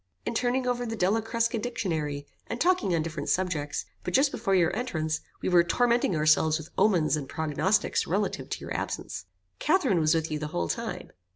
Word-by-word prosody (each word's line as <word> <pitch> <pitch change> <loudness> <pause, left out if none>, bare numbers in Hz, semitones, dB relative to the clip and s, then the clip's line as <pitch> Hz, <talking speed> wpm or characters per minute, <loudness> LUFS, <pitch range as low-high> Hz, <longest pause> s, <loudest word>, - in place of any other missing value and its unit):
"In - - -2
turning 250 +2 +1
over 245 -1 0
the 225 -2 -3
Della 205 +3 +2
Crusca 230 +1 0
dictionary, 160 -11 -2 0.2
and 230 - -4
talking 355 - +2
on 160 - +1
different 155 -3 -4
subjects; 165 -6 -1 0.2
but - - -2
just 275 +2 +4
before 195 - 0
your 175 -1 +3
entrance, 160 -10 -1 0.2
we - - +1
were 175 -1 +6
tormenting 235 +1 +2
ourselves 155 0 +4
with 160 -1 -10
omens 175 -8 +3
and 140 -3 -5
prognosticks 160 +6 +1
relative - - -1
to - - -4
your - - -5
absence." - - -4 0.3
"Catherine 375 - +2
was 155 +1 +3
with 160 -1 -1
you 155 - -1
the 150 - -3
whole 85 - -2
time?" - - -4
180 Hz, 190 wpm, -28 LUFS, 155-230 Hz, 0.3 s, were